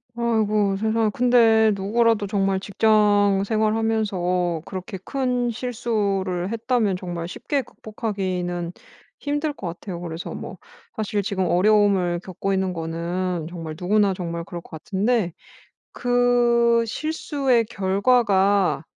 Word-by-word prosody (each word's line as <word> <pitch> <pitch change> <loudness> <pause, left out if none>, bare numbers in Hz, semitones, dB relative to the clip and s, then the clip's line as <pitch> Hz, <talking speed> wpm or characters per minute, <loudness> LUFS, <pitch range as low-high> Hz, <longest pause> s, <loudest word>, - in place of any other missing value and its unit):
아이고 215 -4 +1
세상에. 220 +1 +1
근데 225 -3 +4
누구라도 220 +2 +1
정말 195 -2 0
직장 205 -1 +3
생활하면서 210 -6 0
그렇게 190 0 -6
큰 250 -3 -1
실수를 205 -6 -2
했다면 230 -4 0
정말 175 -2 -5
쉽게 280 +9 -2
극복하기는 185 -7 -4 0.5
힘들 290 +1 -2
것 190 - -7
같아요. 170 +1 -6
그래서 165 0 -6
뭐 - - -7 0.4
사실 210 -1 -1
지금 190 -1 -1
어려움을 185 -1 +3
겪고 195 +1 -3
있는 190 -1 0
거는 170 +1 -3
정말 165 -3 -7
누구나 200 +2 +2
정말 170 -2 -4
그럴 170 0 -7
것 - - -20
같은데 190 +3 -1 0.6
그 240 -1 +3
실수의 275 -4 0
결과가 200 -3 +2
205 Hz, 265 characters per minute, -23 LUFS, 180-230 Hz, 0.6 s, 근데